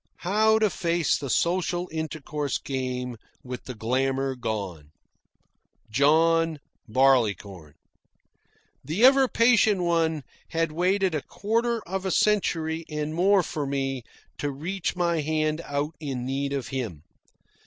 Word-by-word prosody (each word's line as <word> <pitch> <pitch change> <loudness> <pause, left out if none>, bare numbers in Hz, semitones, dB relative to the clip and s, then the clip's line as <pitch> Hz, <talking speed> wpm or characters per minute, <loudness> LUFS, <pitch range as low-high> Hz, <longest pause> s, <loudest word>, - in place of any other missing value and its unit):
How 215 +4 +4
to 215 -3 +2
face 170 -3 +1
the 140 - -4
social 175 +3 0
intercourse 155 -3 -3
game 125 -2 -4 0.3
with 125 -1 -7
the 130 - -6
glamour 135 +4 0
gone? 100 -11 -4 1.0
John 160 +5 +3 0.3
Barleycorn. 110 - +1 1.1
The 185 +11 +2
ever 270 0 +6
patient 230 -6 +4
one 165 -3 +1 0.3
had 165 -1 0
waited 185 +3 +1
a 155 - -1
quarter 230 - -1
of 190 +2 -3
a - - 0
century 165 -6 +1
and 150 0 -3
more 190 +3 +4
for 150 -3 -3
me 135 -1 -2 0.4
to 145 - -1
reach 170 +8 -3
my 170 -2 +1
hand 155 +1 0
out 145 +2 -2
in 135 -5 -4
need 140 +1 -2
of 140 -3 -3
him. 110 - -4
155 Hz, 125 wpm, -26 LUFS, 135-180 Hz, 1.1 s, ever